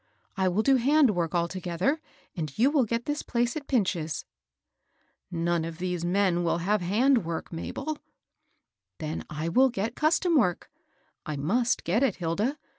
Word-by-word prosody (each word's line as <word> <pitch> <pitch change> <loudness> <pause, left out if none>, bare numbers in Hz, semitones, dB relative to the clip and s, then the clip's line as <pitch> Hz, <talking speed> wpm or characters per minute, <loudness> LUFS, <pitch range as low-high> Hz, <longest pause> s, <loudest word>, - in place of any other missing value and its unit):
I 190 -1 +1
will 190 +4 +1
do 270 +1 +5
hand 275 +1 +4
work 175 -3 -1
altogether, 180 - -1 0.3
and 155 -6 -5
you 260 +5 +4
will 285 -5 +3
get 230 +2 -2
this 295 0 -2
place 240 -1 -1
at 295 -2 -6
Pinch's." 180 - 0 0.6
" - - -43 0.2
None 170 -1 0
of 165 0 -6
these 180 -1 -2
men 180 -1 +2
will 170 - +1
have 200 +4 +1
hand 230 +6 +3
work, 165 +1 -5
Mabel." 300 - -4 0.5
" - - -53
Then 155 -1 -4
I 155 +2 -3
will 260 +10 +4
get 225 0 -2
custom 325 +3 +2
work; 180 - +1 0.3
— - - -42
I 155 - -2
muBt 230 - +1
get 195 +8 +1
it^ 265 -8 +2
Hilda. 200 - -1
195 Hz, 175 wpm, -27 LUFS, 170-255 Hz, 0.6 s, do